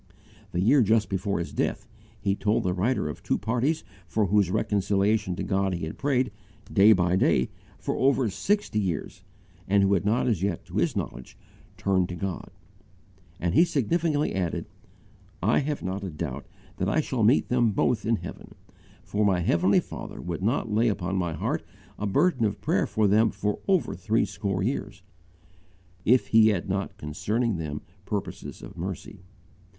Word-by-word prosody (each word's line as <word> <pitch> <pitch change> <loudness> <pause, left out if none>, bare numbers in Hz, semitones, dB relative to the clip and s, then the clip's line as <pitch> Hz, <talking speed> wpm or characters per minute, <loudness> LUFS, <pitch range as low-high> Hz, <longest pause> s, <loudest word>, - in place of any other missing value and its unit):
The 90 - -1
year 130 +8 +5
just 110 0 +3
before 95 +1 -1
his 85 - -4
death, - - -1 0.3
he 100 - +1
told 105 +1 +1
the 90 - 0
writer 100 +1 0
of 75 - -6
two - - 0
parties 125 +8 0 0.2
for 105 +5 +1
whose 100 -1 +3
reconciliation 100 0 +1
to - - -4
God 95 -1 0
he 85 - -3
had 80 - -7
prayed, 130 -4 +1 0.4
day 105 +1 +7
by 90 -3 +3
day, 65 -8 +2 0.3
for - - -3
over 135 -2 +3
sixty 200 - 0
years, 90 -2 -3 0.4
and 100 +1 +4
who 100 +1 +3
had 95 - +2
not 110 +5 +2
as 110 -8 +1
yet 100 +1 -2
to - - -6
his - - +1
knowledge 65 - -5 0.4
turned 95 -2 +1
unto - - -4
God: 95 0 -4 0.9
and 85 -1 0
he 165 - +6
significantly 155 - 0
added, 90 -3 -2 0.8
"I - - +4
have 145 0 -2
not 95 +2 -3
a 95 - -3
doubt 75 -4 -5 0.3
that 95 - 0
I 155 - +2
shall 130 -5 -1
meet 110 +6 +4
them 120 -2 +3
both 105 +2 +1
in 115 +1 +2
heaven; - - -9 0.5
for 105 +1 -1
my 95 -3 +3
Heavenly 90 +3 +3
Father - - -7
would 85 0 -4
not 110 +2 0
lay 115 +3 +3
upon 95 -3 -1
my 90 -3 -1
heart 75 - -2 0.4
a 105 - -1
burden 130 - +2
of 105 -2 0
prayer - - +1
for 110 -1 +2
them 110 +3 +4
for 105 +1 -2
over 190 -3 +2
threescore 100 -3 -1
years, 100 -5 -3 1.0
if 125 +3 +4
He 110 -1 +6
had 100 -4 +1
not 100 +1 -2
concerning 105 +8 -1
them 75 -2 -5 0.2
purposes 100 - -5
of - - -10
mercy." 95 +3 -6
100 Hz, 175 wpm, -26 LUFS, 95-115 Hz, 1.0 s, day